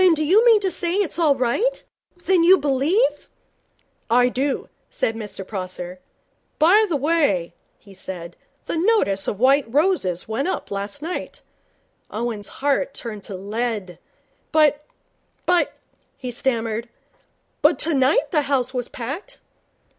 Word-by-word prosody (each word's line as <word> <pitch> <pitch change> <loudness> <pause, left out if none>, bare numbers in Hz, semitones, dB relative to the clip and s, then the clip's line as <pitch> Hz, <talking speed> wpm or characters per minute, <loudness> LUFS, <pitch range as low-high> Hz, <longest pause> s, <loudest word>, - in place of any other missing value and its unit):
'Then 365 -3 +6
do 310 - -1
you 385 +9 +5
mean 455 -3 +7
to 385 -2 -1
say 345 +2 -1
that 410 - +3
it's 335 - -6
all 305 -4 +4
right 270 - 0 0.4
that 380 - +2
you 350 +3 +6
believe 295 - +1 0.4
' - - -42
'I 245 +2 +4
do,' 265 +2 -2 0.2
said 225 - -1
Mr 210 -3 -7
Prosser. 185 -2 -6 0.6
'By 400 +8 +5
the 330 - 0
way,' 280 - +1 0.2
he 200 - -17
said, 180 -2 -7 0.3
'the - - -2
notice 325 - +2
of 205 - -2
White 265 -1 +3
Roses 280 - +1
went 225 +8 -1
up - - -3
last 200 +8 -4
night.' 350 +3 -5 0.7
Owen's 220 -2 -4 0.2
heart 280 -1 +1
turned 215 -4 -5
to 195 - -6
lead. 205 -2 -3 0.5
'But 300 -2 +3 0.6
but 355 -1 +2 0.2
' - - -42
he 250 - -3
stammered. 235 -2 -2 0.7
'But 300 0 +4
tonight 285 -1 +2
the 305 - +3
house 260 -2 +1
was 245 -2 -2
packed.' 295 - -7
270 Hz, 145 wpm, -22 LUFS, 220-330 Hz, 0.7 s, mean